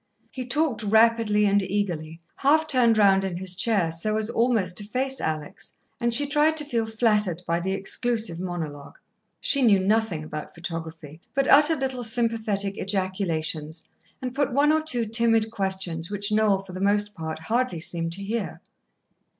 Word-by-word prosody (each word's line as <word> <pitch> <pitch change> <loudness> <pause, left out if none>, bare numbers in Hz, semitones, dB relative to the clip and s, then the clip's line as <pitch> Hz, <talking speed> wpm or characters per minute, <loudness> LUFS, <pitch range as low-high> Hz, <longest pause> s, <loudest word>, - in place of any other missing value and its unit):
He 255 -2 -6
talked 295 -2 0
rapidly 220 0 +3
and 200 0 +3
eagerly, 170 -5 -3 0.2
half 310 +3 +3
turned 245 -6 +4
round 195 -2 +4
in 185 -3 -3
his 185 0 -1
chair 190 -3 +1
so 215 +7 -1
as 220 +1 -1
almost 225 -7 +1
to - - -3
face 260 +5 -2
Alex, 155 -2 -5 0.3
and 235 -1 0
she 285 +5 +5
tried 300 +2 +2
to 300 - +3
feel 230 -5 -1
flattered 210 -6 0
by 170 +1 0
the 190 +2 -2
exclusive 220 -1 -1
monologue. 160 -6 -6 0.4
She 280 - +3
knew 215 -6 +5
nothing 200 -4 0
about 155 0 -8
photography, 165 -2 -7
but 275 0 +2
uttered 300 0 +5
little 260 -2 -2
sympathetic 220 -4 -1
ejaculations, 170 -5 -2 0.4
and 250 -1 -4
put 285 +1 0
one 285 +4 +3
or 315 0 +2
two 250 -7 -1
timid 225 0 +2
questions 190 -5 -2
which 205 +1 -2
Noel 210 -2 +2
for 190 -2 -12
the 185 - -6
most 205 +1 +1
part 160 -4 -6
hardly 220 +3 -1
seemed 165 0 -3
to 200 +3 -3
hear. 220 +1 -4
205 Hz, 165 wpm, -24 LUFS, 175-235 Hz, 0.4 s, she